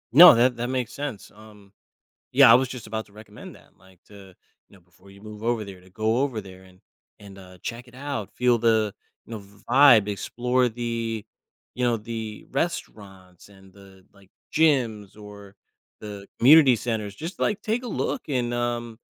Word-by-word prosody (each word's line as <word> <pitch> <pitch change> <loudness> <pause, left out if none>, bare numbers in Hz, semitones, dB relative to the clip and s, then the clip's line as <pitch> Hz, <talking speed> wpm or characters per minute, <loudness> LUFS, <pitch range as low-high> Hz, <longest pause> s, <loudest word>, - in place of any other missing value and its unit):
No, 175 0 +11
that 120 +1 +2
that 120 +1 -3
makes 125 -2 -3
sense, 140 -8 -7
um, 105 -2 -17 0.6
yeah, - - +7
I - - +9
was 130 +1 +3
just 125 -2 -9
about 110 0 -5
to 105 - -23
recommend 105 0 -13
that, - - -22
like 95 -1 -22
t0, 100 -2 -14 0.4
you - - -19
know, - - -21
before 90 +3 -22
you 100 0 -17
move 105 0 -11
over 115 -1 -1
there 95 -2 -11
to 95 +1 -21
go 110 +4 -1
over 130 -5 -1
there 95 -2 -14
and 95 0 -20 0.4
and, 100 -1 -14
uh, 90 -1 -14
check 120 +1 -6
it 125 - -19
out, 135 -6 -5
feel 125 -1 +2
the, 110 -3 +1 0.3
you - - -13
know, 110 - -5
v 100 +1 -19
vibe, 125 -5 +6
explore 125 +5 -1
the, 115 -1 -4 0.5
you 125 - -2
know, 120 -1 +2
the 110 -1 -7
restaurants 100 - -6
and 95 -1 -19
the, 95 -1 -18
like, 100 -1 -22 0.2
gyms 115 -10 +1
or 100 -1 -13 0.5
the 100 -2 -9
community 140 0 +7
centers. 110 -3 -4
Just, 165 - -8
like, 210 0 -1
take 225 +4 -2
a 250 - -7
look 255 - -3
and, 120 -4 -1
um, 120 -1 -3
110 Hz, 190 wpm, -24 LUFS, 100-125 Hz, 0.6 s, No